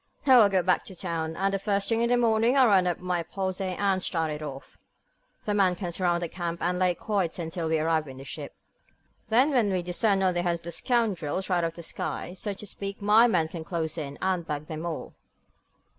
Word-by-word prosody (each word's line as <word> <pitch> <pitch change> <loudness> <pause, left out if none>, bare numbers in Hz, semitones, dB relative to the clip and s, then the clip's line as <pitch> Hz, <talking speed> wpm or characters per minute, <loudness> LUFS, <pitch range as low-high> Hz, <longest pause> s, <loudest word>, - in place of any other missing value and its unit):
Now 260 -3 +8
I'll 210 -3 +6
go 190 -2 +2
back 180 +1 +2
to 190 - -9
town, 165 -3 -3
and 195 +1 0
the 195 - 0
first 200 0 0
thing 230 0 +1
in 235 - +2
the 245 - +4
morning 230 +2 +3
I'll 265 - +7
round 195 -5 +4
up 175 - 0
my 180 -1 -1
posse 190 +2 -3
and 195 -2 +1
start 165 -3 0
it 150 0 -5
off. 135 -3 -8 0.7
The 210 - 0
men 190 -3 +3
can 175 -1 -4
surround 175 0 0
the - - -1
camp, 170 0 -4
and 180 +1 0
lay 180 -1 +2
quiet 195 -5 -1
until 165 -1 -3
we 160 - +2
arrive 155 -1 0
in 130 -1 -10
this 135 +1 -10
ship. - - -7 0.7
Then, 255 +7 +4
when 235 -7 +2
we 185 -2 0
descend 195 +3 +1
on 185 -1 +3
the 175 - 0
heads 170 -1 -1
of - - -29
the 170 - -6
scoundrels, 190 - -1
right 180 - +3
out 170 - 0
of 165 - -2
the 170 - -9
sky, 175 - -4
so 205 +3 -3
to 205 - -7
speak, 200 0 -6
my 215 +3 +5
men 175 -8 +2
can 165 -1 -6
close 160 -3 -3
in, 145 -4 -5
and 185 -3 0
bag 150 0 -3
them 160 +2 -5
all." 165 - -5
180 Hz, 240 wpm, -27 LUFS, 165-200 Hz, 0.7 s, Now